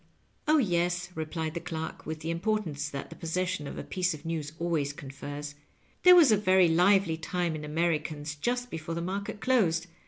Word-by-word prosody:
"Oh, 310 +1 +5
yes," 175 - +1
replied 160 0 -3
the 170 - -3
clerk, 160 -1 -6
with 155 0 -4
the 165 +1 -2
importance 165 -5 -1
that 140 +1 -6
the - - -8
possession 175 -1 -2
of - - -7
a - - -4
piece 180 -2 -1
of 150 - -14
news 160 -3 -3
always 160 -5 -1
confers, 145 +1 -7 0.5
"there 360 0 +9
was 320 -9 +7
a 215 - +5
very 190 -3 +5
lively 180 0 +4
time 170 +1 -2
in 155 - -6
Americana 155 -1 -1 0.2
just 245 +3 -1
before 165 +1 -4
the - - -2
market 200 +3 -4
closed. 185 -11 +2
165 Hz, 185 wpm, -29 LUFS, 155-185 Hz, 0.5 s, there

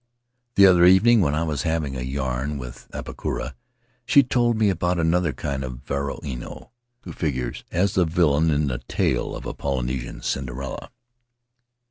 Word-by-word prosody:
"The 100 - +8
other 90 -2 +6
evening, 100 +6 +6
when 75 -4 +1
I 80 - 0
was 75 -5 -2
having 80 -3 -1
a 65 - -4
yarn 65 +2 -2
with 60 -2 -9
Apakura, 65 - -4 0.5
she 140 +3 +5
told 120 -2 +1
me 105 -2 +3
about 90 0 0
another 85 0 +2
kind 70 +1 -4
of 65 0 -7
varua 70 0 -3
ino, 60 -3 -5
w - - -11
r - - -45 0.3
ho - - -6
figures 65 -6 -3
as 95 +3 +1
the 90 - +3
villain 80 -2 +2
in 75 0 +2
the 60 -4 -2
tale - - 0
of - - -8
a - - -4
Polynesian 65 -2 -3
Cinderella. 65 0 -4
75 Hz, 170 wpm, -23 LUFS, 65-90 Hz, 0.5 s, The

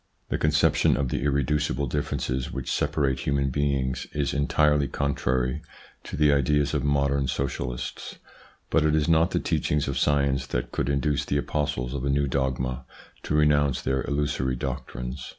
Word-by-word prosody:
The - - -1
conception 75 -4 +3
of 70 -2 -1
the - - -2
irreducible 70 0 0
differences 65 -1 -2
which 65 -2 -4
separate 65 -3 0
human 70 0 0
beings 65 -2 -1
is 70 -2 -1
entirely 75 0 +2
contrary 65 -1 -1 0.4
to - - -6
the 75 -1 +4
ideas 70 +1 +2
of - - 0
modern 70 -1 +1
socialists, 60 -2 -4 0.6
but 80 - +3
it 75 0 +3
is 75 -1 +1
not 80 0 +4
the - - 0
teachings 75 -1 0
of 70 - -1
science 70 -2 +1
that 60 - -3
could 65 - -1
induce 70 0 +1
the 70 - 0
apostles 70 -4 -2
of 70 -2 -3
a 70 - 0
new 70 +1 +2
dogma 65 -1 -1 0.4
to - - -2
renounce 75 -3 +3
their 65 0 -1
illusory 70 -3 -1
doctrines. 65 0 -5
70 Hz, 160 wpm, -26 LUFS, 65-75 Hz, 0.6 s, the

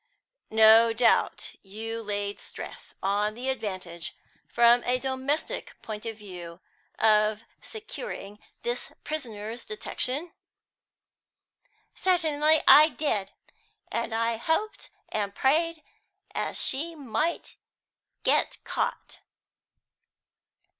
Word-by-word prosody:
"No 220 +1 +7
doubt 230 0 +2
you 225 +3 -6
laid 205 -1 -3
stress - - -8
on 205 +2 +1
the 250 +3 -2
advantage, 185 -9 -4 0.3
from 240 0 +5
a 250 +1 +2
domestic 265 +3 -3
point 215 -1 -6
of 225 -1 -5
view, 180 -5 -9 0.4
of 215 0 +3 0.2
securing 430 - -7 0.2
this 480 +1 -3
prisoner's 230 -6 -5
detection?" 335 -6 -4 1.6
"Certainly 315 -4 +3
I 305 +2 +9
did, 210 -11 -1 0.6
and - - -2
I 230 0 +1
hoped 325 - -1 0.2
and 200 -2 -2
prayed 320 +4 +2 0.5
as - - -2
she 325 +5 0
might 300 +4 -2 0.7
be - - +4 0.3
caught!" - - -3
230 Hz, 90 wpm, -27 LUFS, 210-300 Hz, 1.6 s, I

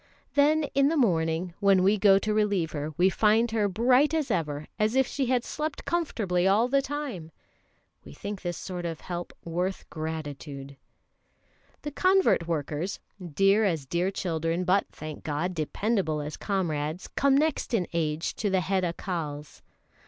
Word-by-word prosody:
Then 300 +2 +4
in 275 0 +4
the 320 +2 +1
morning, 170 - +1
when 195 -2 +4
we 200 +3 +4
go 195 -1 +6
to 210 +2 -1
relieve 205 -6 +1
her, 150 0 -4
we 180 - +5
find 220 +3 +3
her 215 -2 +2
bright 250 - +3
as 310 -4 0
ever, 150 -3 -1
as 215 +3 +2
if 265 0 +4
she 270 0 -2
had 250 -1 +2
slept 300 +2 -4
comfortably 205 - 0
all 210 +5 +4
the 275 +2 +2
time. 265 - -5 0.7
We 70 - -12
think 205 - -6
this 175 -1 -3
sort 180 -2 -5
of 165 -2 -4
help 175 -1 -5
worth 180 +3 -2
gratitude. 145 -3 -6 1.1
The 295 - -4
convert 370 - +3
workers, 160 +2 -2 0.4
dear 195 +2 +4
as 165 -8 0
dear 175 +7 0
children, 165 -2 -1
but, 185 +2 +2
thank 155 -1 -8
God, 160 +4 -2
dependable 175 0 -1
as 150 +1 -5
comrades, 165 -4 -2
come 275 -1 +3
next 310 -1 0
in 205 -7 +1
age 160 -1 -1
to 210 - 0
the 190 -1 +2
head 190 +2 0
Accals. 165 -4 -4
185 Hz, 160 wpm, -27 LUFS, 160-225 Hz, 1.1 s, go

